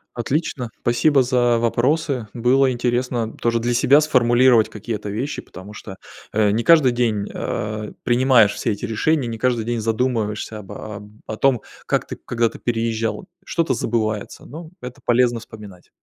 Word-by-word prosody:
Отлично. 125 0 -2
Спасибо 135 +3 +3
за 120 -2 +2
вопросы. 125 +2 0
Было 130 +2 +3
интересно 120 -1 -1
тоже 115 0 0
для 120 +1 0
себя 140 +5 +5
сформулировать 125 -5 +4
какие-то 105 -1 -6
вещи, 120 +8 -3
потому 95 +3 -12
что, 95 -2 -9 0.4
э, 105 -1 +2
не 110 +3 0
каждый 155 -6 +6
день, 110 -4 0
а, 105 0 -4
принимаешь 120 -4 +4
все - - -1
эти 105 - -6
решения, 125 +4 0
не 115 - -5
каждый 120 -2 0
день 120 0 -2
задумываешься 110 -2 -1
об 95 - -12
о 105 -1 -8 0.2
о 110 - -5
том, 135 -2 +2 0.2
как - - 0
ты, - - -6
когда-ты 115 -1 -2
переезжал. 115 +3 -2 0.2
Что-то 165 -6 0
забывается, 110 -3 -2
но 160 +3 -10
это 125 +2 -9
полезно 120 0 +3
вспоминать. 105 -5 -13
120 Hz, 155 wpm, -21 LUFS, 110-130 Hz, 0.4 s, каждый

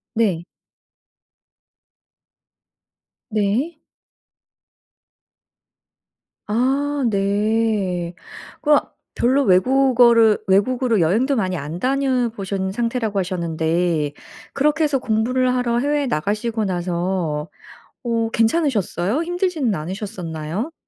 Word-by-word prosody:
네. 190 -7 +1 2.9
네. 220 +10 0 2.7
아. 260 +6 +1 0.2
네. 200 -3 0 0.5
그러면 295 -1 +4 0.3
별로 265 +4 +2
외국어를 235 +1 +4
외국으로 230 +3 +2
여행도 225 - +2
많이 185 -3 0
안 155 +3 -6
다녀보신 235 -7 -1
상태라고 230 -2 -1
하셨는데 170 -3 -1 0.4
그렇게 300 +3 +1
해서 290 -3 +1
공부를 250 +3 +1
하러 240 -1 0
해외에 290 +1 0
나가시고 215 +4 -1
나서 175 -3 -2 0.5
어 230 -2 0
괜찮으셨어요? 225 - +1
힘들지는 350 - -1
않으셨었나요? 180 - -5
220 Hz, 205 characters per minute, -21 LUFS, 185-255 Hz, 2.9 s, 그러면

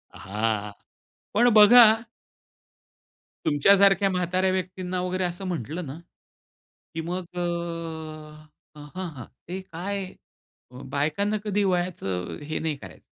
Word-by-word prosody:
हां. 105 +1 -2 0.6
पण 240 +3 +5
बघा 235 +3 +10 1.6
तुमच्यासारख्या 195 +5 +5
म्हाताऱ्या 185 +1 +1
व्यक्तींना 185 0 -3
वगैरे 185 0 -1
असं 175 +2 -3
म्हंटलं 170 0 -4
ना 140 +3 -8 1.0
की 165 - -2
मग 180 +2 -4
अ, - - -3 1.4
हं, 150 0 -10
हं, 165 -10 -6 0.2
ते 185 +3 -4
काय 190 +2 -5 0.8
बायकांना 160 +10 0
कधी 205 0 +1
वयाचं 175 - -2
हे 155 +2 -3
नाही 160 -2 -2
करायचं. 95 -8 -12
180 Hz, 105 wpm, -25 LUFS, 150-190 Hz, 1.6 s, बघा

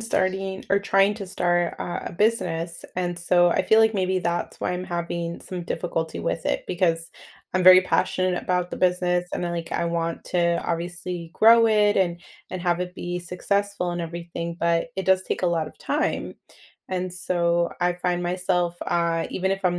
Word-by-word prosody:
starting 190 -3 -1
or 200 - +5
trying 195 0 +3
to 200 -2 -7
start, 175 -1 0
uh, 175 - -3
a - - -5
business, 170 -5 -1
and, 175 -1 -2
so 175 0 +4
I - - +2
feel 220 0 +5
like 220 0 +4
maybe 185 -1 +1
that's 175 -1 -2
why - - -1
I'm 180 +1 -3
having 170 -1 -4
some 180 -2 -6
difficulty 165 -2 -3
with 165 - -2
it, - - -1
because 165 -2 0 0.4
I'm 185 0 +1
very 185 0 +10
passionate 185 -1 0
about 180 -1 -1
the - - -4
business, 180 -1 +1
and - - -2
then, 175 - -1
like, 170 -1 -5
I 170 - 0
want 170 0 -2
to, 170 -1 +1
obviously, 175 0 -4
grow 230 +1 +7
it 210 -2 +3
and 175 -3 +1 0.3
and 185 -2 -5
have 175 -1 +1
it 180 0 -4
be 175 -1 -4
successful 180 +1 -1
and 175 - -3
everything, 170 0 -5
but 170 +4 +1
it 190 - -3
does 190 0 +3
take - - -3
a - - +3
lot 165 -2 0
of - - -12
time. - - -1 0.5
And, 185 -1 -2
so, 175 -1 0
I 175 0 +2
find 175 0 -1
myself, 180 -1 0
uh 170 -1 +1
even 190 +1 -1
if 195 0 -2
I'm 175 -1 +2
180 Hz, 190 wpm, -24 LUFS, 170-185 Hz, 0.5 s, very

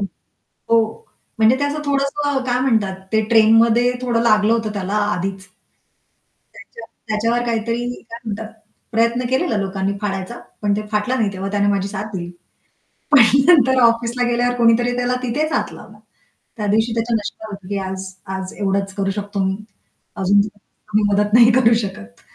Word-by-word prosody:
हं, 200 - -1 0.7
हो. 230 - +1 0.3
म्हणजे 225 +3 +5
ते - - 0
असं 295 +1 -3
थोडंसं 280 0 0
काय 250 -1 0
म्हणतात, 220 -7 +1 0.2
ते 220 0 +3
ट्रेनमध्ये 230 +2 +5
थोडं 240 -2 0
लागलं 215 -1 +3
होतं 225 -2 -1
त्याला 195 -1 -4 0.2
आधीच 190 +1 -4 1.1
त्याच्या 230 - -12 0.2
त्याच्यावर 230 +3 0
काहीतरी 230 +1 -1 0.3
काय 230 - -7
म्हणतात, 220 0 -5 0.4
प्रयत्न 230 +2 +1
केलेला 260 -4 +1
लोकांनी 195 -1 -2
फाडायचा, 195 +2 -4 0.2
पण 205 -1 +1
ते 215 0 -4
फाटलं 210 +5 0
नाही 210 -4 0
तेव्हा, 195 +1 -5
त्याने 205 0 +1
माझी 200 -1 0
साथ 200 0 -5
दिली. 175 -2 -5 0.8
पण 285 - +7 0.3
नंतर 260 -7 +5
ऑफिसला 235 +1 +2
गेल्यावर 245 +1 +1
कुणीतरी 235 +1 +3
त्याला 245 0 0
तिथेच 295 +6 -1
हात - - -1
लावला. - - -13 0.6
त्या 210 - -3
दिवशी 220 +3 +1
त्याच्या 230 +1 -1
नशिबात 215 +1 -5
होतं 195 -2 -10
की 200 - -2
आज-आज 190 0 -6
एवढंच 195 -1 -1
करू 195 0 -2
शकतो 205 0 -5
मी. 190 0 0 0.6
अजून 195 0 +2 0.5
आम्ही 215 0 +2
मदत 205 +1 +1
नाही 235 0 +7
करू 235 -1 +4
शकत. 100 - -8
220 Hz, 160 wpm, -19 LUFS, 200-240 Hz, 1.1 s, पण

